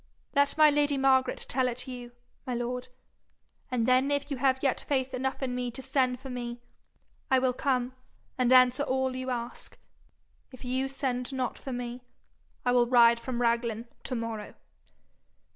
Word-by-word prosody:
Let 285 +1 +3
my 305 -1 +7
lady 290 -1 +2
Margaret 265 -1 +2
tell 260 0 +1
it 250 +1 -4
you, 245 -1 -8 0.3
my 250 - -1
lord, 245 +1 -3 0.8
and 245 -3 0
then 255 +2 +4
if 285 0 -1
you 275 - -1
have 260 0 +2
yet 270 -3 +1
faith 265 -2 -1
enough 265 +2 -2
in 255 -2 -2
me 250 0 -2
to 240 +3 -7
send 255 -3 +1
for 265 0 -8
me, 240 -1 -5 0.7
I 265 - +5
will 255 -1 +2
come 255 -1 0 0.4
and 250 -1 +1
answer 255 +1 +6
all 265 -2 0
you 255 0 -4
ask. 240 -1 -5 0.7
If 255 -1 -11
you 260 +2 -1
send 265 -2 -2
not 260 -2 -3
for 270 - -7
me, 245 0 -5 0.6
I 245 - +3
will 245 -1 +4
ride 235 -1 +6
from 245 0 -3
Raglan 235 -1 0 0.2
to 255 - -3
morrow.' 230 -2 -5
255 Hz, 170 wpm, -29 LUFS, 245-265 Hz, 0.8 s, my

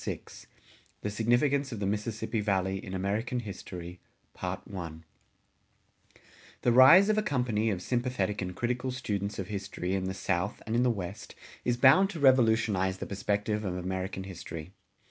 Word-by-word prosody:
VI - - -3 0.8
THE 105 - -3
SIGNIFICANCE 130 +6 +2
OF 115 - -5
THE 100 - -1
MISSISSIPPI 105 +2 -2
VALLEY 95 -2 0
IN 95 - -6
AMERICAN 105 +6 -1
HISTORY[177:1] 90 -3 -8 1.6
The 120 - +4
rise 150 - +8
of 215 0 +3
a - - +2
company 125 - 0
of 95 -3 -2
sympathetic 120 -4 -1
and 90 -1 -4
critical 125 +4 -1
students 105 -5 -3
of 95 -2 -5
history 95 -2 -3
in 95 -1 -1
the 95 0 -3
South 95 +1 -1
and 110 - -2
in 120 - +3
the 125 - +3
West 95 -4 -5 0.3
is 120 -1 +1
bound 140 +10 +6
to 180 -5 -6
revolutionize 110 -8 +3
the - - -5
perspective 105 +2 -1
of 90 -3 -2
American 95 +1 -3
history. 85 -3 -8
105 Hz, 150 wpm, -29 LUFS, 95-120 Hz, 1.6 s, rise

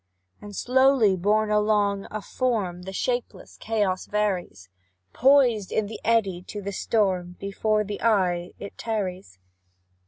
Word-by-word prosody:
And, 205 -1 -9
slowly 255 -5 +3
borne 210 +4 +1
along, 210 -2 +1
a 215 -1 -5
form 210 -9 -2
The 190 +1 -7
shapeless 245 +5 -3
chaos 205 -4 -1
varies; 195 - -2 0.5
Poised 250 -6 +4
in 220 - 0
the 215 +2 -7
eddy 200 -6 +1
to 205 +3 -8
the 200 0 -5
storm, 185 -4 0
Before 210 +2 0
the 205 0 -6
eye 185 -6 +1
it 200 - -10
tarries. 185 - -4
205 Hz, 130 wpm, -25 LUFS, 190-220 Hz, 0.5 s, Poised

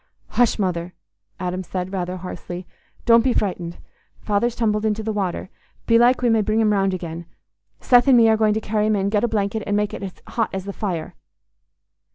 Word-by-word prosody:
"Hush, 245 -1 +2
Mother," 180 -3 -2 0.4
Adam 180 0 -2
said, 185 +1 -5
rather 180 -1 -3
hoarsely, 180 0 -7 0.4
"don't 230 -1 +6
be 255 -1 +2
frightened. 175 -4 -2 0.4
Father's 225 +3 0
tumbled 215 -2 0
into 220 0 0
the 220 0 -2
water. 190 -3 -3 0.3
Belike 240 +2 +4
we 240 - +4
may 225 -1 +3
bring 215 +1 0
him 215 -2 +3
round 195 -1 +1
again. 170 -1 -7 0.5
Seth 245 +1 +5
and 260 -2 +7
me 230 -1 +6
are 220 - +5
going 215 -1 +2
to 220 - -1
carry 215 0 0
him 215 - +2
in. 195 0 0
Get 210 +1 +1
a - - +3
blanket 215 -1 -1
and 205 - +1
make 210 0 -1
it 195 -2 -7
hot 225 -2 -1
as 190 0 -4
the 200 - -5
fire." 175 -7 -4
210 Hz, 200 wpm, -22 LUFS, 185-225 Hz, 0.5 s, and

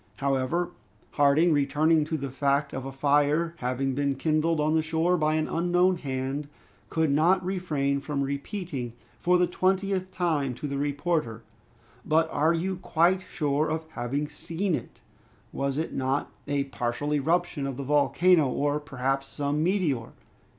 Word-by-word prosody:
However, 140 +6 0 0.4
Harding, 150 +4 +4
returning 150 +2 +3
to 160 +1 -2
the 140 -2 -5
fact 140 +1 0
of 130 0 -4
a 135 - -5
fire 145 +4 +2
having 130 +1 -1
been 140 0 0
kindled 155 +3 +1
on 150 +1 +2
the 160 - +3
shore 160 +3 +1
by 155 -2 +1
an 155 0 0
unknown 180 +2 +2
hand, 135 0 -3 0.4
could 160 -2 +1
not 175 +6 +3
refrain 150 -7 -1
from 140 0 -2
repeating 140 - -4 0.3
for 180 +1 +3
the 180 - +4
twentieth 185 +1 0
time 155 -8 0
to 150 - -7
the 140 -1 -3
reporter, 145 -5 -1 0.6
"But 160 +1 +2
are 155 +3 +2
you 185 +3 -2
quite 180 +1 +2
sure 150 0 0
of 160 +1 -2
having 140 +3 -2
seen 170 +5 -3
it? - - -5 0.5
Was 140 0 -1
it 160 - -2
not 135 +2 -1 0.2
a 140 -1 +1
partial 135 +2 -3
eruption 160 0 0
of 135 -2 -5
the 140 - -4
volcano, 150 +3 +3
or 145 +3 0
perhaps 135 -1 -2
some 145 +1 -2
meteor?" 165 - 0
150 Hz, 155 wpm, -27 LUFS, 140-170 Hz, 0.6 s, Harding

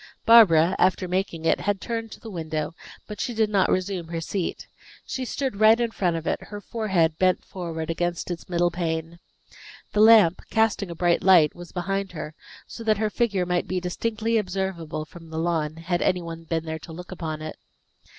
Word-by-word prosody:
Barbara, 190 -7 +7
after 185 0 +2
making 180 -3 -2
it, - - +3
had 205 -1 -1
turned 230 +1 -3
again - - -15
to - - -11
the 225 - -9
window, 155 -3 -3 0.3
but 210 - -7
she 240 - -3
did 220 -1 +1
not 195 -2 +3
resume 185 -2 -1
her 165 0 -4
seat. 175 +2 -3 0.4
She 260 - -4
stood 260 -5 -3
right 220 +2 +6
in 235 -1 0
front 180 -6 0
of 165 -1 -4
it, - - -1
her 205 - -7
forehead 190 -8 0
bent 185 -1 +2
forward 165 -3 -5
against 175 +1 -2
its 170 +1 -6
middle 175 0 +2
pane. 165 -1 -3 0.7
The 210 - +1
lamp, 215 -6 +7
casting 220 -3 +1
a 170 - -6
bright 175 0 +2
light, 175 -6 +6
was 175 -1 -11
behind 195 +1 -3
her, 155 -1 -6 0.3
so 230 - -9
that 215 -2 +2
her 215 0 0
figure 200 -6 0
might 180 0 -1
be 185 - -1
distinctly 220 +5 -1
observable 180 -6 -3
from 165 0 -14
the 160 - -6
lawn, 160 -2 -1
had 175 +2 -2
any 180 -1 +1
one 165 0 -8
been 165 0 -2
there 160 0 -4
to 160 - -11
look 180 +3 -9
upon 160 -4 -5
it. 155 - -7
180 Hz, 200 wpm, -25 LUFS, 165-205 Hz, 0.7 s, Barbara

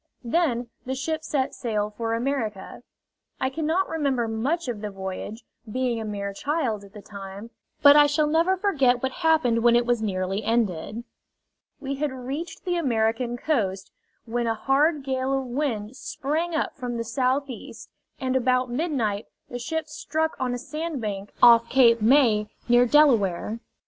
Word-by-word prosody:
Then 245 -3 0
the 260 +1 -3
ship 315 +4 -3
set 280 -3 -1
sail 210 -4 -2
for 230 -1 -1
America. 230 -6 -3 0.6
I 260 - 0
cannot 320 +5 0
remember 275 -7 0
much 260 +9 -1
of 230 -4 -4
the 210 - -3
voyage, 195 +3 -6 0.3
being 245 -1 -1
a - - -4
mere 200 -1 -4
child 255 -4 -1
at 200 0 -15
the 210 - -11
time, 200 +2 -9 0.3
but 285 0 +9
I 295 0 +7
shall 295 +1 +2
never 330 +5 +2
forget 275 -11 +2
what 265 - 0
happened 315 -8 +2
when 235 0 +5
it 240 0 +3
was 240 -2 +1
nearly 195 0 -2
ended. 225 -1 -1 0.8
We 275 -1 -4
had 295 0 -1
reached 270 +9 -6
the 355 -1 0
American 240 -4 0
coast, 200 -10 -1 0.3
when 235 0 -1
a 225 - +1
hard 285 +5 +2
gale 265 0 0
of 270 - -3
wind 245 -4 -2
sprang 315 +6 -3
up 315 - -1
from 245 -3 -4
the 230 - -2
southeast, 255 +2 -2 0.3
and 260 -2 -1
about 255 0 +2
midnight 240 -8 -1 0.2
the 245 - -4
ship 320 +6 -3
struck 315 +1 -2
on 250 -1 -1
a - - -3
sandbank 245 -9 -4
off 235 -1 +7
Cape 235 -4 +5
May, 220 -3 +4 0.2
near 240 +1 +5
Delaware. 230 - +3
250 Hz, 160 wpm, -25 LUFS, 225-290 Hz, 0.8 s, but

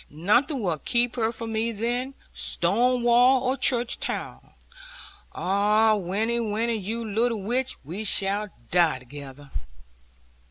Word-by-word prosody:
Nothing 235 - +1
will 170 -5 -1
keep 240 - +1
her 225 -2 0
from 230 -1 -6
me 225 +1 0
then, 245 +5 -3 0.2
stone 250 0 +1
wall 245 +2 +5
or 260 +1 +1
church 245 -2 +1
tower. - - -4 0.9
Ah, 210 +4 +2
Winnie, 210 +4 -1
Winnie, 230 +1 -1
you 225 +2 -3
little 225 +2 0
witch, 255 +5 -1
we 175 +10 -6
shall 205 0 +2 0.2
die 170 -5 +3
together.' 140 +2 -12
225 Hz, 125 wpm, -25 LUFS, 195-240 Hz, 0.9 s, wall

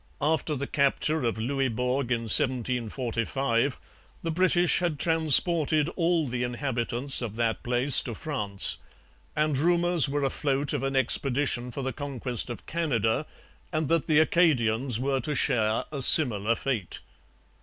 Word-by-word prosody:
After 155 0 -1
the 140 +1 -4
capture 140 +2 0
of 115 -1 -2
Louisbourg 125 +1 -2
in 115 -2 0
1745 120 +2 -1 0.5
the 165 - -2
British 175 0 +2
had 170 -4 -2
transported 160 0 +3
all 170 -3 -1
the 125 0 -4
inhabitants 125 +1 -1
of 110 -3 -5
that 115 -1 -2
place 125 +3 +3
to 120 - -7
France; 105 -11 0 0.6
and 150 -1 0
rumours 175 +1 +2
were 145 0 -2
afloat 140 +1 -1
of 145 - -2
an 135 0 -3
expedition 130 -1 0
for 130 +3 -6
the 130 0 -3
conquest 130 -3 -3
of 120 - -8
Canada 145 -5 -1 0.4
and 155 -3 -2
that 165 -2 0
the 155 - +2
Acadians 130 -8 +1
were 135 +1 -1
to 150 +4 -4
share 110 -6 0
a 140 -3 -5
similar 115 -6 +6
fate. 115 -8 -4
135 Hz, 140 wpm, -26 LUFS, 120-155 Hz, 0.6 s, similar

